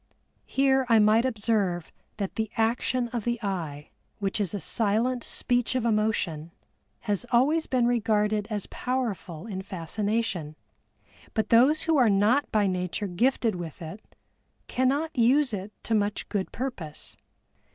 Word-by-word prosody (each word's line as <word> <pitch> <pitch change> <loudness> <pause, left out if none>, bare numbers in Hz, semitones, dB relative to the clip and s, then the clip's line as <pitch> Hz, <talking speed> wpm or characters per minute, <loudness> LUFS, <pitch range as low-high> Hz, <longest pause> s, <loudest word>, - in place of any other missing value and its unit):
Here 270 0 +3
I 230 - +6
might 215 +3 +5
observe 210 -7 0 0.3
that 200 -3 -3
the 220 -1 -2
action 240 +2 +1
of 235 -2 -3
the 240 +1 0
eye, 160 -7 -4 0.3
which 200 +1 -1
is 190 -5 +1
a 205 - -3
silent 230 +5 +1
speech 245 0 0
of 250 -2 0
emotion, 210 -8 0 0.5
has 205 -3 -1
always 290 +7 +3
been 250 -2 +2
regarded 215 -3 +1
as 210 -3 -3
powerful 220 -9 -3
in 195 -4 -5
fascination, 190 -2 -2 0.8
but 220 - 0
those 265 +7 +5
who 325 -2 +2
are 245 -4 +5
not 210 +8 +3
by 210 -2 +3
nature 180 +2 -1
gifted 225 +4 +1
with 170 -4 -7
it 170 +6 -8 0.6
cannot 280 +5 0
use 255 +2 +3
it 200 +1 -4
to 230 - -1
much 205 -1 0
good 195 -2 -2
purpose. 215 - -4
220 Hz, 140 wpm, -27 LUFS, 195-245 Hz, 0.8 s, I